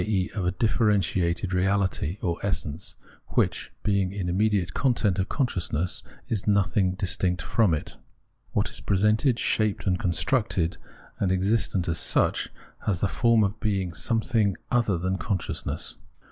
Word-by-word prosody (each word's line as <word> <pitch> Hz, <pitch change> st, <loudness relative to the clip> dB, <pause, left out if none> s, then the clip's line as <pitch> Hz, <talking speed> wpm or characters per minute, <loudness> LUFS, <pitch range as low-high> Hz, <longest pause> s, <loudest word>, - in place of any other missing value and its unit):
e. 100 Hz, -4 st, 0 dB
of 100 Hz, -3 st, -2 dB
a -, -, +2 dB
differentiated 95 Hz, -3 st, +1 dB
reality 95 Hz, -2 st, +1 dB
or 85 Hz, -2 st, -1 dB
essence, 80 Hz, -6 st, -3 dB, 0.4 s
which, -, -, +1 dB
being 100 Hz, -2 st, +1 dB
an 95 Hz, -3 st, -2 dB
immediate 95 Hz, -2 st, +1 dB
content 115 Hz, -8 st, +1 dB
of 95 Hz, -, -1 dB
consciousness, 90 Hz, -, -1 dB, 0.3 s
is 110 Hz, -3 st, -2 dB
nothing 100 Hz, -2 st, +2 dB
distinct 90 Hz, -1 st, 0 dB
from 110 Hz, -6 st, +2 dB
it. 75 Hz, -, -3 dB, 0.6 s
What -, -, +1 dB
is -, -, -6 dB
presented, 105 Hz, +6 st, +2 dB
shaped 110 Hz, -4 st, 0 dB
and 90 Hz, -3 st, +1 dB
constructed, 95 Hz, -2 st, +1 dB, 0.4 s
and 95 Hz, -, +1 dB
existent 95 Hz, -1 st, +1 dB
as 85 Hz, -1 st, 0 dB
such, -, -, +2 dB, 0.4 s
has 95 Hz, -5 st, +1 dB
the 100 Hz, -, +2 dB
form 115 Hz, +1 st, +3 dB
of 100 Hz, +2 st, -1 dB
being 95 Hz, -5 st, -1 dB
something 110 Hz, -1 st, 0 dB
other 115 Hz, -6 st, +2 dB
than 95 Hz, +2 st, -1 dB
consciousness. 95 Hz, 0 st, -3 dB
95 Hz, 140 wpm, -26 LUFS, 90-110 Hz, 0.6 s, form